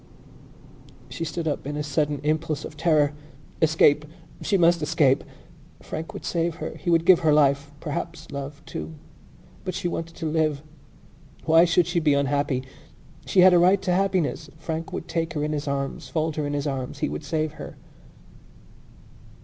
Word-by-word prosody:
She - - -5
stood 160 +1 -3
up 145 -2 -2
in 145 0 -3
a 150 - -2
sudden 145 0 -1
impulse 155 0 -1
of - - -9
terror. 150 -2 +2 0.5
Escape! 155 -2 +4 0.4
She 200 - +1
must 170 -1 +4
escape! 150 -4 +3 0.6
Frank 160 +2 -6
would - - -8
save 170 -1 -1
her. - - -5
He 180 - -4
would 165 -1 +3
give 185 -1 +7
her 160 -3 +3
life, 145 -1 +3
perhaps 165 +1 -5
love, 140 +2 -6
too. 160 - -6 0.7
But 185 - -4
she - - -2
wanted 165 -1 -4
to 165 - -6
live. 155 -2 0 0.8
Why 165 +1 +6
should 170 0 +3
she 175 -1 0
be 150 -3 +3
unhappy? 140 -1 0 0.6
She 185 - +4
had 185 0 +8
a 175 - +6
right 185 +3 +5
to 185 - 0
happiness. 180 -5 0
Frank 160 +1 -4
would 165 - -5
take 165 0 -2
her 150 -2 -2
in 150 - -1
his 150 -1 -3
arms, 140 -1 -3
fold 155 +2 -1
her 150 -2 -1
in 145 - -3
his 145 0 -2
arms. 135 -1 -3
He - - -1
would - - -5
save 155 +1 -1
her. - - -9
155 Hz, 175 wpm, -25 LUFS, 145-165 Hz, 0.8 s, had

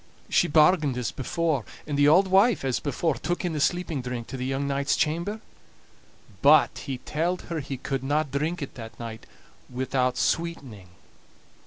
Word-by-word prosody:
She - - +3
bargained 150 -3 +4
as 120 -6 -2
before; 150 - -1 0.2
and 150 - -3
the 145 0 +4
auld 185 +5 +5
wife, 195 - +4
as 130 -3 0
before, 155 +3 -1
took 175 +1 -3
in 175 - -1
the 150 - -2
sleeping 170 -2 0
drink 125 -2 -5
to - - -6
the 130 0 -3
young 135 +1 -1
knight's 140 +1 0
chamber; 170 +8 -1 1.0
but - - +6
he 135 -3 -3
telled 165 +7 -2
her 165 - -1
he 135 -1 -5
couldna 135 +4 -1
drink 155 +3 -2
it 140 - -8
that 115 -2 -10
night 115 -2 -8 0.4
without 130 0 -1
sweetening. 135 - -2
145 Hz, 165 wpm, -26 LUFS, 130-165 Hz, 1.0 s, but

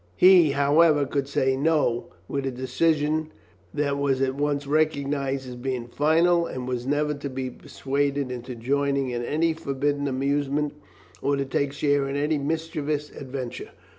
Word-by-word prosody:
He, 180 -5 +6
however, 145 +1 +4
could 140 0 -2
say 135 -1 +1
"no" 140 -4 +1 0.2
with 140 -1 -2
a - - -1
decision 150 +4 0 0.4
that 140 -1 -1
was 140 -2 +1
at 130 0 +1
once 145 0 -1
recognized 140 -3 0
as 125 - -7
being 125 -1 -3
final, 165 +6 +3
and 125 -1 -5
was 125 0 -3
never 150 +1 +1
to 145 -1 -5
be 130 -1 -4
persuaded 140 +1 -2
into 125 0 -6
joining 140 +2 0
in 120 0 -3
any 160 +5 +1
forbidden 145 -1 -1
amusement 140 +2 0 0.5
or 140 - +1
to 140 0 -1
take 135 +1 -1
share 145 -1 +1
in 135 - -3
any 150 +1 +1
mischievous 150 -1 -2
adventure. 130 -2 -6
140 Hz, 155 wpm, -25 LUFS, 135-150 Hz, 0.5 s, He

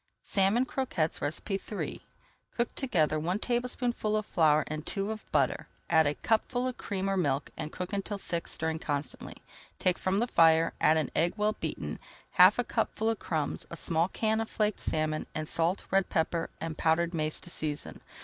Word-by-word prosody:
SALMON 200 +6 +3
CROQUETTES 215 - -1 0.3
III 200 +1 -3 0.6
Cook 235 0 0
together 160 - +1
one 175 +5 0
tablespoonful 240 -2 -1
of 215 - -2
flour 155 -5 +3
and 155 0 -5
two 195 +4 -2
of 220 - -8
butter, - - +1 0.2
add 160 -2 +5
a 145 - 0
cupful 245 +3 0
of 255 -1 -3
cream 195 -1 -2
or 195 - +1
milk, 145 -6 0
and 155 0 -5
cook 180 +2 -5
until 200 +1 -2
thick, 170 -3 -3
stirring 160 0 -1
constantly. 145 -2 -4 0.4
Take 185 -1 +1
from 190 +1 +1
the 230 - +2
fire, 165 -6 +4
add 155 - +5
an 155 -4 -1
egg 170 +2 +2
well 210 +1 +2
beaten, - - -5 0.3
half - - +7
a - - +2
cupful 220 +1 -1
of 225 - -4
crumbs, 155 -4 -2
a 170 - -6
small 165 +1 +1
can 220 +3 0
of 225 - -4
flaked 210 -1 0
salmon, 155 0 -1
and 155 0 -2
salt, 170 +5 0
red 195 -1 +2
pepper, 165 +1 0
and 160 -1 -5
powdered 170 +2 +2
mace 155 -1 0
to 175 - -7
season. 150 -3 -3
175 Hz, 180 wpm, -30 LUFS, 160-215 Hz, 0.6 s, half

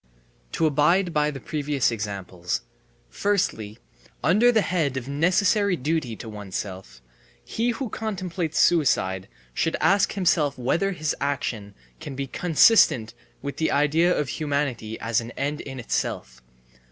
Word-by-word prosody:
To 165 - +1
abide 165 +5 +2
by 150 0 +2
the 140 -2 -6
previous 145 -2 -1
examples: 95 - -4 0.5
Firstly, 110 - -1 0.5
under 215 +9 +5
the 220 -3 +3
head 155 -7 0
of 130 -1 -5
necessary 185 +7 +2
duty 145 -5 -2
to 115 - -9
oneself: 95 - -7 0.4
He 235 +2 -1
who 245 +2 -2
contemplates 185 -7 -4
suicide 95 - +2 0.3
should 165 - 0
ask 195 +1 +3
himself 165 -7 +1
whether 170 +11 0
his 155 -3 -2
action 125 -7 -3 0.2
can 135 - -7
be 140 +1 -3
consistent 155 - +4 0.3
with 140 0 -5
the 160 - +1
idea 150 +5 +3
of 145 -4 -1
humanity 140 -8 -2
as 115 0 0
an 115 - -8
end 145 +2 -2
in 135 -2 -8
itself. - - -3
145 Hz, 135 wpm, -24 LUFS, 115-175 Hz, 0.5 s, under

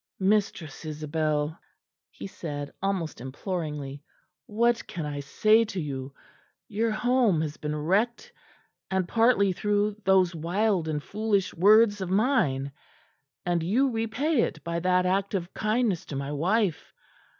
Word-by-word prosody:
"Mistress 190 -7 0
Isabel," 155 0 -2 0.5
he - - -10
said 145 -6 -6
almost 185 -9 -2
imploringly, 145 0 -5 0.5
"what 235 +2 +1
can 165 -3 -5
I 145 -1 -4
say 215 +11 +3
to 195 -3 -5
you? 135 -4 -5 0.6
Your 225 +3 0
home 230 -4 +2
has 155 -1 -4
been 150 0 -3
wrecked; 215 - 0 0.6
and 190 -2 0
partly 225 -4 +3
through 205 +2 0
those 190 -2 +4
wild 175 +2 0
and 150 -2 -2
foolish 205 -2 -1
words 205 +3 +5
of 185 - -3
mine; 185 - +1 0.7
and 175 -1 +1
you 245 +11 +2
repay 230 +6 0
it 160 - -2
by 170 0 -2
that 180 +1 +2
act 195 +2 0
of 180 -1 -3
kindness 215 -4 0
to 145 - -7
my 140 +1 -3
wife! 175 +2 0
185 Hz, 135 wpm, -27 LUFS, 155-215 Hz, 0.7 s, words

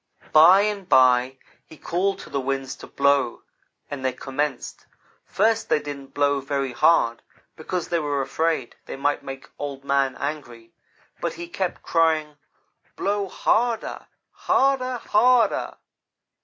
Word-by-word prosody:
"By 175 +6 +7
and 205 -3 -2
by 130 -1 +4 0.3
he 160 - -16
called 190 +5 -1
to - - -12
the 140 - -1
winds 135 0 -3
to - - -11
blow, 140 -3 +1 0.5
and 140 -2 -5
they 130 - +1
commenced. 135 +1 -4 0.4
First 220 +2 +1
they - - +4
didn't 140 -2 -9
blow 145 -1 +2
very 135 -1 -2
hard, 120 -3 +3 0.3
because 175 +2 -4
they 170 -1 +1
were 145 -2 -1
afraid 145 -1 -2
they - - -6
might 145 +2 0
make 135 0 -9
Old 140 -1 -6
man 140 -2 +1
angry, 120 -6 -6 0.5
but - - -2
he 175 - -8
kept 185 +1 -4
crying: 155 -2 +1 0.6
"'Blow 200 0 -1
harder 230 +3 -1 0.2
harder 260 -2 +1
harder! 240 +2 +2
145 Hz, 135 wpm, -23 LUFS, 135-185 Hz, 0.6 s, By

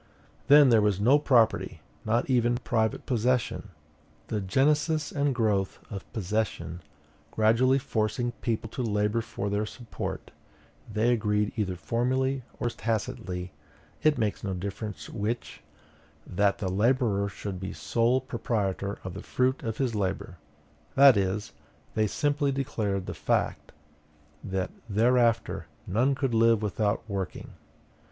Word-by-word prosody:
Then 145 -1 +8
there 115 -3 +5
was 105 -2 +2
no 130 +8 +5
property, 120 -6 +2 0.3
not 115 +2 +1
even 120 -2 +2
private 110 -3 -1
possession. 125 -2 0 0.6
The 105 -2 -1
genesis 145 - +1
and 140 -2 0
growth 105 -5 +1
of 100 -2 -7
possession 105 -4 -2 0.5
gradually 115 - +3
forcing 120 -1 -1
people 115 -1 -1
to - - -4
labor 105 0 +1
for 100 -2 -5
their 105 +1 -1
support, 120 0 -6 0.6
they 110 +3 +2
agreed 105 -2 +1
either 100 -5 -1
formally 130 - 0 0.2
or 120 - 0
tacitly, 95 -6 -3 0.5
it 155 -1 +3
makes 110 -3 -1
no 95 -2 -2
difference 95 -3 -5
which, 110 +4 -4 0.6
that 100 +2 +1
the 100 - -3
laborer 105 -1 +2
should 95 -1 -6
be 95 +1 -5
sole 120 +3 +1
proprietor 105 -5 -2
of 95 - -6
the - - -7
fruit 130 +1 0
of 110 -1 -4
his 130 -4 0
labor; 95 -3 -2 0.6
that 135 -2 +8
is, 100 +2 -1 0.4
they 110 -1 +2
simply 145 +4 0
declared 110 -9 -2
the 90 - -5
fact 75 - -1 0.7
that 95 -2 -2 0.2
thereafter 115 -4 +2 0.2
none 120 +9 +2
could 130 -2 -1
live 115 -1 +4
without 105 +1 -1
working. 100 -4 -5
110 Hz, 130 wpm, -28 LUFS, 100-125 Hz, 0.7 s, Then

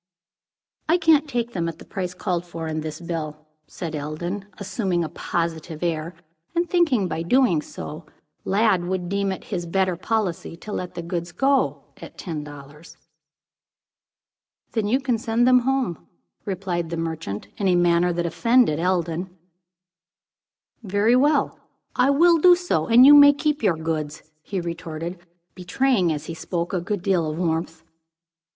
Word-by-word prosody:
"I 340 - +5
can't 310 -4 +3
take 240 -2 -2
them 170 -2 -1
at 160 - -8
the - - -13
price 180 -2 -5
called 180 -2 -2
for 165 -2 -6
in 155 0 -3
this 155 0 -6
bill," 155 -3 -5 0.2
said 165 -3 -6
Eldon, 155 +7 -4
assuming 195 -3 -1
a 160 - -4
positive 165 -1 -3
air, 165 0 -2 0.4
and 345 +1 +1
thinking, 305 - +2
by 160 -1 -3
doing 180 - +3
so, 155 +1 -9 0.4
Lladd 195 -3 +2
would 180 -1 -3
deem 200 0 0
it 190 - -6
his 175 -2 -3
better 185 +1 +1
policy 185 -3 -2
to 210 - -9
let 180 -3 -5
the 170 - -5
goods 170 0 -4
go 270 +5 +1
at - - -12
ten 160 -5 -5
dollars. 145 +2 -12 1.7
"Then 220 -3 -1
you 250 +5 +2
can 250 -4 -1
send 230 +1 +1
them 255 0 +6
home," 255 - -1 0.4
replied 180 -4 -3
the 170 - -4
merchant, 160 -12 -4
in 200 - 0
a 180 - +4
manner 175 0 +3
that 175 0 -2
offended 230 -1 +3
Eldon. 175 0 -1 1.5
"Very 205 +3 +2
well, 285 +2 +2 0.4
I 260 - +3
will 335 +4 +5
do 360 +2 +7
so, 350 - -1
and 240 +3 +7
you 290 - +10
may 285 0 +9
keep 300 0 -1
your 190 -7 +2
goods," 155 -2 -3 0.2
he 195 +4 -4
retorted, 170 0 -5 0.3
betraying, 190 0 +1
as 150 -2 -4
he 165 - -6
spoke, 170 +2 -4
a 180 - 0
good 200 0 -3
deal 180 -5 +1
of 155 - -5
warmth. 165 -1 -2
180 Hz, 160 wpm, -23 LUFS, 165-230 Hz, 1.7 s, you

